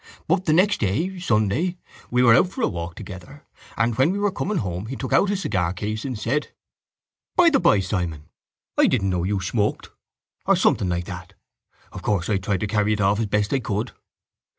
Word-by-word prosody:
But 185 -1 +1
the 155 - +3
next 195 +5 +3
day, 160 - -1
Sunday, 125 - 0 0.3
we 125 +1 +2
were 115 -2 +7
out 175 - +4
for 240 +6 -5
a - - +4
walk 85 -1 -5
together 95 -3 -10 0.3
and 115 +2 +2
when 135 +5 +5
we 195 - -1
were 205 0 +1
coming 200 +1 -2
home 95 - -3
he 135 - -5
took 130 - -4
out 200 - +4
his 200 -1 -1
cigar 90 -4 0
case 105 +3 -4
and 130 -4 -3
said:—By 150 - -2
the 275 - +4
by, 100 - +4
Simon, 90 -6 -3 0.6
I - - +6
didn't 95 0 +1
know 90 -1 0
you 100 +2 0
smoked, 105 +3 -1 0.6
or - - +5
something 95 - +2
like 90 0 -2
that.—Of 95 0 -12
course 100 -5 -1
I 105 - +2
tried 95 0 -2
to - - 0
carry 105 +1 +1
it 105 - -2
off 100 +1 +2
as 115 - 0
best 105 +2 0
I 135 - +2
could. 110 0 -3
105 Hz, 200 wpm, -23 LUFS, 95-145 Hz, 0.6 s, were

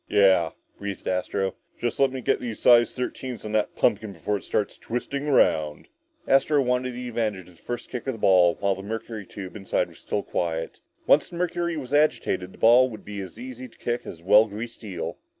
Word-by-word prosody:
"Yeah," 95 -5 +5 0.3
breathed 100 -1 -5
Astro, 95 +1 -1 0.3
"just 120 -1 -2
let 135 -1 +4
me 130 -1 -5
get - - +1
my 120 -2 -3
size 120 +2 +5
thirteens 125 -1 -4
on 105 - -4
that 110 -1 0
pumpkin 105 -2 +1
before 95 +4 -2
it - - -11
starts 105 - -1
twisting 140 +4 -3
around!" 80 - +2 0.4
Astro 135 +2 +4
wanted 125 0 0
the 125 0 -5
advantage 105 -6 -2
of 90 -2 -17
the - - -22
first 120 0 -6
kick 125 +1 -5
at - - +2
the - - -8
ball 90 -4 +5
while 100 -1 +2
the 95 - -7
mercury 110 -1 -6
tube 95 -1 -8
inside 95 -2 -1
was - - -16
still - - -2
quiet. 80 -1 -3 0.3
Once - - +4
the - - -9
mercury 170 -1 -1
was 135 -2 -6
agitated, 120 -11 +2
the - - -16
ball 125 +3 +6
would 110 -3 -10
be 100 -1 -5
as 95 +1 -9
easy 130 +1 -8
to 115 - -22
kick 120 0 -3
as 85 - -8
a - - -21
well 105 +3 +7
greased 115 +3 -7
eel. 85 -5 -5
110 Hz, 215 wpm, -25 LUFS, 95-125 Hz, 0.4 s, well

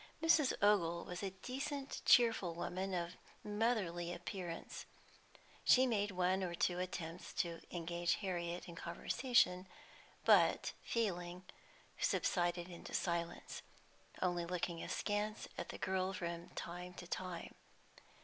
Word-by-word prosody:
Mrs. 320 -4 +5
Ogle 170 -5 +4
was 180 0 -5
a 195 - -1
decent, 270 +7 -4
cheerful 225 -8 +5
woman, 185 +3 -2
of 170 -1 -1 0.3
motherly 205 -6 0
appearance. 175 -1 -5 0.8
She 260 +1 +7
made 210 -4 +1
one 185 0 +2
or 175 -2 -2
two 175 +1 +1
attempts 180 -1 -4
to 170 -1 -1
engage 170 0 0
Harriet 175 -3 -3
in 170 - -7
conversation, 180 +2 +2 0.6
but, - - +5
failing, 180 -5 -1 0.5
subsided 175 -1 +1
into 175 -2 -7
silence, 170 -1 -2 0.6
only 175 -1 +1
looking 170 -1 -2
askance 210 +1 -1
at 175 - -5
the - - -5
girl 190 0 0
from 170 -1 -4
time 180 +1 -5
to 180 - -8
time. 175 -1 -4
180 Hz, 120 wpm, -38 LUFS, 170-205 Hz, 0.8 s, She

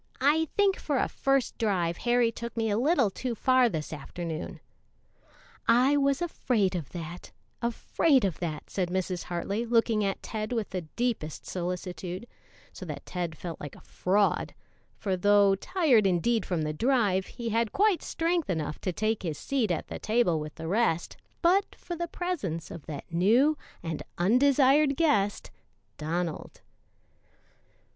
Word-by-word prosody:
I 300 +4 +3
think 400 -2 +4
for 290 -3 -1
a - - +2
first 275 -2 0
drive 180 -6 0
Harry 240 -1 +2
took 235 0 -7
me 225 -1 +1
a 205 - +1
little 265 - +3
too 245 +3 -3
far 255 +1 +4
this 160 -5 -4
afternoon." 160 +2 -6 1.1
"I 250 +5 +5
was 280 +2 +2
afraid 230 - 0
of 165 -7 -4
that 175 0 -7 0.3
afraid 245 +2 +2
of 185 -5 -2
that," 160 -4 -5
said 185 -3 -1
Mrs. 185 -1 -2
Hartley, 195 +5 -2
looking 230 -2 +2
at 195 -1 -2
Ted 215 +1 -4
with 225 -3 -2
the 185 -1 -2
deepest 230 -11 -2
solicitude, 180 +2 -4 0.5
so - - -9
that - - -6
Ted 175 -3 -4
felt 170 0 -7
like 145 - -7
a - - -14
fraud, 200 +3 0 0.4
for 195 -3 -1
though 205 +1 +5
tired 245 - +3
indeed 195 +5 +1
from 170 -4 -1
the 155 0 -2
drive, 205 - +2
he 235 -2 -5
had 230 0 +1
quite 405 -3 +3
strength 335 - -1
enough 155 -4 -2
to 185 - -1
take 215 +4 -1
his 160 -5 -3
seat 265 -7 0
at 175 - -2
the - - -6
table 215 -8 +2
with 150 0 -7
the 160 0 -6
rest 180 -3 +1 0.3
but 380 +4 +3
for 345 - -6
the 345 +1 -3
presence 275 - -3
of 165 - -9
that 145 -3 -6
new 230 - +4 0.3
and 165 -2 -3 0.2
undesired 275 - +4
guest, 210 -12 +1 0.5
Donald. 165 +1 -3
210 Hz, 155 wpm, -28 LUFS, 175-255 Hz, 1.1 s, I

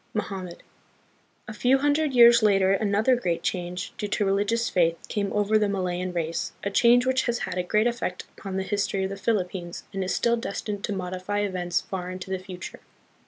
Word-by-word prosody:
Mohammed. 190 -4 -4 0.8
A 215 - -6
few 250 +5 +3
hundred 290 +2 +1
years 235 -1 +8
later 195 -3 +4
another 210 +5 +2
great 175 -8 -2
change, 180 0 -3
due 210 - -2
to 205 0 0
religious 205 +4 +1
faith, 170 -2 +2
came 200 -2 -1
over 210 +1 +2
the 210 -1 +1
Malayan 185 -2 -2
race, 170 -1 -3
a 200 - -2
change 240 +4 +5
which 260 0 +1
has 240 0 +1
had - - -5
a - - +3
great 210 +5 +1
effect 235 -6 -2
upon 190 -1 -5
the 190 - -1
history 200 -1 -1
of 190 - -2
the - - -4
Philippines, 190 -4 -2
and 195 -1 -2
is 185 - -2
still 235 0 +2
destined 205 -3 -4
to - - -4
modify 185 +1 -3
events 180 -3 -1
far 180 -2 -5
into 185 +1 -7
the 190 - -1
future. 185 -1 -9
200 Hz, 195 wpm, -26 LUFS, 185-220 Hz, 0.8 s, years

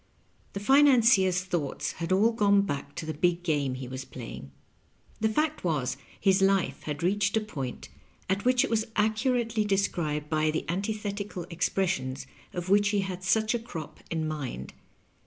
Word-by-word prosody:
The 200 - -3
financier's 230 -7 +5
thoughts 175 -7 -2
had 170 +1 -5
all 205 +5 +4
gone 200 -3 +4
back 140 -6 -4
to 160 - -5
the 155 - -3
big 175 +3 +1
game 145 -6 0
he 130 -1 -6
was 130 +1 -5
playing. 70 - -9 0.7
The 220 - +2
fact 305 +7 0
was, 140 -8 0 0.2
his 190 0 +3
life 195 -1 +2
had 150 +1 -4
reached 200 +3 +2
a - - +4
point 145 - -6 0.4
at 195 +2 0
which 255 0 +4
it - - -1
was 220 -1 +1
accurately 225 +1 +1
described 170 -7 0
by 155 0 +1
the 155 - -2
antithetical 200 0 -3
expressions 170 -7 -1 0.3
of 175 0 -5
which 205 +2 +4
he 205 -1 +1
had 185 -1 -5
such 215 +4 +2
a 240 - 0
crop 165 -9 -8
in 160 -1 -1
mind. 135 - -5
190 Hz, 165 wpm, -28 LUFS, 155-210 Hz, 0.7 s, financier's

